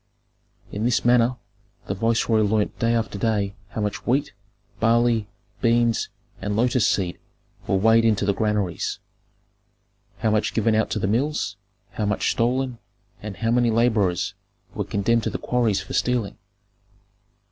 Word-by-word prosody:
In 105 - -3
this 120 0 +1
manner 120 +1 +4 0.5
the - - -2
viceroy 115 +2 +1
learned 105 0 0
day 115 0 +2
after 110 -3 -2
day 105 -3 0 0.2
how 110 - -4
much 105 -1 -3
wheat, 135 +4 +1 0.5
barley, 115 -1 +2 0.3
beans, 115 -1 +2 0.3
and 100 0 -2
lotus 120 +1 +2
seed 90 -3 -1 0.5
were - - +2
weighed 110 +4 +4
into 105 -3 +2
the 100 - +2
granaries, 105 -3 -1 1.2
how 110 +1 0
much 105 0 0
given 110 0 +2
out 110 0 +1
to - - -2
the 105 - -1
mills, 120 +2 0 0.4
how 105 - -2
much 105 - +1
stolen, 125 +1 0 0.4
and 105 -3 -7
how 115 +5 0
many 120 0 +3
laborers 110 -6 +1 0.4
were - - -2
condemned 115 +3 +1
to - - -2
the - - -3
quarries 120 -5 0
for - - -8
stealing. 125 -5 0
110 Hz, 145 wpm, -23 LUFS, 105-120 Hz, 1.2 s, manner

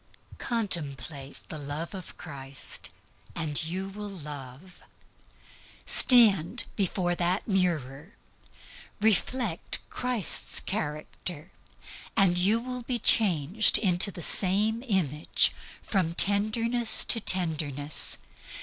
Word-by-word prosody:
Contemplate 145 - -5
the 155 - -8
love 145 +5 -6
of 185 -3 -10
Christ, 135 -1 -8 0.5
and 160 -2 -2
you 185 +4 -5
will 205 +1 -9
love. 150 -1 -11 1.0
Stand 225 -4 +3
before 185 -3 -1
that 175 +2 -2
mirror, 170 - -3 0.8
reflect 220 -2 -1
Christ's 250 -5 0
character, 155 -1 -6 0.7
and 195 -4 +3
you 195 +6 +2
will 250 +1 -7
be 245 +1 -3
changed 195 -3 +4
into 185 0 +3
the 175 -3 -7
same 210 +5 +1
image 160 - +1 0.3
from 180 -5 -2
tenderness 220 +4 +5
to 230 - +2
tenderness. 155 -7 +2
185 Hz, 95 wpm, -26 LUFS, 155-210 Hz, 1.0 s, tenderness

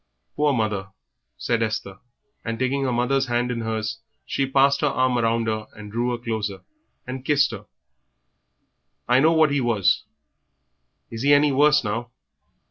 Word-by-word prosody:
"Poor 150 0 +2
mother!" 105 -6 -1 0.5
said 115 -1 -1
Esther, 110 -3 -3 0.4
and, 115 0 -3
taking 135 +2 0
her 130 - 0
mother's 135 +3 +1
hand 120 +1 0
in 115 -1 -3
hers, 110 0 -3 0.3
she 135 - -1
passed 135 +1 +3
her 150 - +2
arm 130 -2 +1
round 115 -1 +1
her, 110 -1 -3 0.2
drew 120 +3 -1
her 120 - -1
closer, 110 -4 -4 0.4
and 130 +1 -6
kissed 140 -1 +2
her. - - -9 1.4
"I 125 +1 +4
know 160 +4 +4
what 160 -2 +4
he 140 -1 +1
was; 115 -6 +1 1.1
is 115 -1 -6
he 145 +2 +5
any 145 0 +3
worse 150 +2 +4
now?" 115 +3 -3
120 Hz, 155 wpm, -23 LUFS, 115-135 Hz, 1.4 s, he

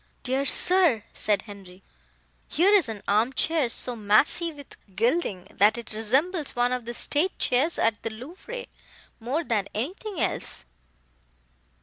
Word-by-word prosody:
"Dear 265 +2 -1
sir!" 345 - +4
said 205 -2 0
Henri, 195 -3 -13 0.6
"here 380 +6 +3
is 390 - +4
an 210 -2 -7
arm 220 +6 +2
chair 310 -3 +1
so 245 +1 +1
massy 225 +11 +2
with 285 -3 -14 0.2
gilding, 215 - -1
that 210 +4 +4
it 235 -2 -5
resembles 275 - 0
one 245 0 +1
of 250 -2 -3
the 240 +1 -6
state 315 +11 0
chairs 275 +7 +1
at 225 -1 0
the 225 - -4
Louvre, 355 - -9 0.5
more 260 +9 -2
then 210 -8 -1
anything 360 - -5
else." - - -3
250 Hz, 140 wpm, -25 LUFS, 215-330 Hz, 0.6 s, sir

